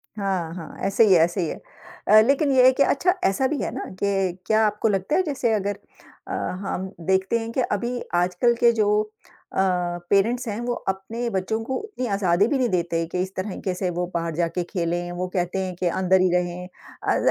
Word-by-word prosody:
हाँ, 190 -5 -2
हाँ। 165 -3 -9
ऐसे 200 +3 +4
ही 190 - +6
है, 170 - +6
ऐसे 175 +2 0
ही 165 - 0
है। - - -6 0.5
अ, 215 +1 +8
लेकिन 275 +4 +2
ये 255 -1 +5
है 260 - +8
कि 280 - +3
अच्छा 360 +8 +2
ऐसा 260 +7 +2
भी 295 - -2
है - - -2
ना - - -4 0.2
कि 195 -3 0
क्या 220 +1 +3
आपको 210 +2 0
लगता 195 +7 0
है 375 - +3
जैसे 260 -7 0
अगर 205 -1 -1 0.5
अ, - - -7 0.3
हम 190 -1 -3 0.2
देखते 190 +4 +2
हैं 225 0 -5
कि 255 - 0
अभी 240 +4 -1 0.2
आजकल 180 +7 +2
के 235 0 +4
जो 205 - +3 0.7
अ, - - -6 0.5
पेरेंट्स 230 +5 +2
हैं, 210 +1 -3
वो 240 0 -1 0.2
अपने 225 +5 -5
बच्चों 195 +2 -1
को 260 +3 -3
उतनी 415 - -5
आज़ादी 195 +1 +2
भी 280 - +1
नहीं 250 -3 +1
देते 170 -2 0
कि 180 - -2
इस 190 +1 -4
तरीक़े 185 -1 -3
से 180 0 -2
वो 175 +1 -2
बाहर 170 -1 -2
जाके 170 +1 -1
खेलें? 175 -1 -2
वो 180 +1 -3
कहते 180 +1 -1
हैं 180 -1 -5
कि 180 0 -1
अंदर 185 +1 +2
ही 185 - +3
रहें। 180 0 -1
अ, 185 - -4
195 Hz, 215 wpm, -24 LUFS, 180-235 Hz, 0.7 s, अ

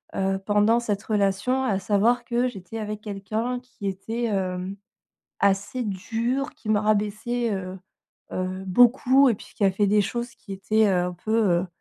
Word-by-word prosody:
heu, 195 0 0
pendant 210 +3 +3
cette 210 -3 -2
relation. 210 +5 +1
À 205 -7 +1
savoir 220 +5 +2
que 240 +1 +1
j'étais 200 0 -8
avec 210 -1 -4
quelqu'un 215 +4 -3
qui 250 -5 -8
était, 220 +5 -3
hem, 190 -2 -2 0.7
assez 200 +5 +1
dur, 230 +7 -2
qui 215 - -11
me 215 - +4
rabaissait, 215 +3 0
heu 185 0 -5 0.5
heu, 185 +1 -3
beaucoup 250 +6 +5
et - - +2
puis, - - -14
qui 205 - +1
a 195 - +5
fait 205 +2 +1
des 210 +1 +4
choses 240 +4 -3
qui 200 - -11
étaient, 215 +3 +2
heu, 180 -2 +2
un 180 - -3
peu, 195 +5 -5
heu 185 -5 +2
210 Hz, 175 wpm, -25 LUFS, 195-235 Hz, 0.7 s, beaucoup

